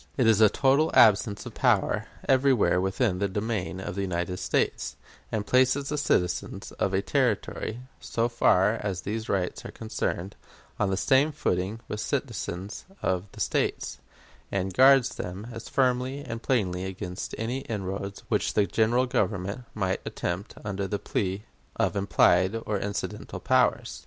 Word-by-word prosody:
It 130 Hz, -, +3 dB
is 110 Hz, -1 st, +5 dB
a 110 Hz, -, +8 dB
total 140 Hz, +6 st, +3 dB
absence 105 Hz, -1 st, +5 dB
of -, -, -8 dB
power -, -, +2 dB, 0.2 s
everywhere 130 Hz, -10 st, +4 dB
within 95 Hz, 0 st, 0 dB
the 100 Hz, -, +1 dB
dominion 100 Hz, -3 st, -3 dB
of 95 Hz, -, -5 dB
the 100 Hz, -, -3 dB
United 90 Hz, -1 st, -2 dB
States, -, -, -1 dB, 0.4 s
and 105 Hz, -2 st, -1 dB
places 130 Hz, +3 st, +3 dB
the 150 Hz, -, -1 dB
citizens 90 Hz, -, -1 dB
of 95 Hz, -, +1 dB
a 95 Hz, -, +1 dB
Territory, 120 Hz, -2 st, -1 dB, 0.2 s
so 115 Hz, 0 st, -1 dB
far 110 Hz, -2 st, +3 dB
as 95 Hz, -3 st, -3 dB
these 110 Hz, +2 st, -4 dB
rights 90 Hz, -2 st, -1 dB
are -, -, -7 dB
concerned, 100 Hz, -4 st, -3 dB, 0.4 s
on 105 Hz, -, +2 dB
the 95 Hz, -, 0 dB
same 135 Hz, +7 st, +3 dB
footing 100 Hz, -5 st, -1 dB
with 105 Hz, -, -4 dB
citizens 105 Hz, -, -3 dB, 0.2 s
of 90 Hz, 0 st, 0 dB
the -, -, -12 dB
States, -, -, -1 dB, 0.5 s
and 95 Hz, -1 st, -1 dB
guards 130 Hz, 0 st, +5 dB
them 90 Hz, +4 st, -5 dB
as 115 Hz, -1 st, -8 dB
firmly 130 Hz, +1 st, +1 dB
and 115 Hz, 0 st, -5 dB
plainly 95 Hz, -9 st, 0 dB
against 90 Hz, -1 st, -5 dB
any 120 Hz, +4 st, -2 dB
inroads 100 Hz, -4 st, -5 dB
which -, -, 0 dB
the 105 Hz, -, +4 dB
General 115 Hz, +5 st, +2 dB
Government 105 Hz, -1 st, -1 dB
might 95 Hz, -3 st, -1 dB
attempt 90 Hz, +4 st, -4 dB
under 100 Hz, -1 st, -2 dB
the 105 Hz, -, -1 dB
plea 95 Hz, 0 st, -2 dB, 0.3 s
of -, -, 0 dB
implied 95 Hz, +1 st, +3 dB
or 105 Hz, -2 st, -1 dB
incidental 100 Hz, +1 st, -4 dB
powers. -, -, +1 dB
105 Hz, 155 wpm, -27 LUFS, 95-120 Hz, 0.5 s, a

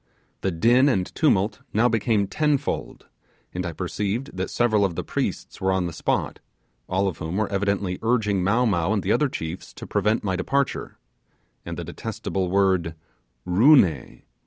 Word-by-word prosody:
The 95 Hz, -, 0 dB
din 120 Hz, -, +4 dB
and 95 Hz, -8 st, -1 dB
tumult 105 Hz, -8 st, +2 dB
now 115 Hz, +3 st, +4 dB
became 110 Hz, -2 st, +1 dB
tenfold, 145 Hz, +5 st, -1 dB, 0.5 s
and 90 Hz, -, -3 dB
I -, -, -3 dB
perceived 100 Hz, -, -3 dB
that 95 Hz, 0 st, -3 dB
several 110 Hz, -4 st, +2 dB
of 95 Hz, -4 st, 0 dB
the -, -, -3 dB
priests -, -, -4 dB
were 95 Hz, 0 st, +2 dB
on 95 Hz, -1 st, +1 dB
the 85 Hz, -, -4 dB
spot, -, -, -1 dB, 0.5 s
all 95 Hz, +2 st, +1 dB
of 90 Hz, -, -4 dB
whom 80 Hz, +4 st, -3 dB
were 110 Hz, -1 st, -1 dB
evidently 100 Hz, -2 st, -1 dB
urging 105 Hz, -5 st, +1 dB
Mow 110 Hz, +7 st, +2 dB
Mow 95 Hz, -2 st, +1 dB
and 100 Hz, -4 st, -1 dB
the 95 Hz, -, 0 dB
other 150 Hz, +3 st, +2 dB
chiefs 80 Hz, -5 st, -6 dB
to -, -, -8 dB
prevent 110 Hz, +2 st, 0 dB
my 95 Hz, -2 st, -1 dB
departure; 140 Hz, +9 st, -1 dB, 0.7 s
and -, -, -5 dB
the -, -, -4 dB
detestable 95 Hz, -2 st, -4 dB
word 95 Hz, -4 st, +2 dB, 0.5 s
'Roo 110 Hz, +13 st, +6 dB
ne! 80 Hz, -, 0 dB
100 Hz, 170 wpm, -24 LUFS, 90-115 Hz, 0.7 s, Roo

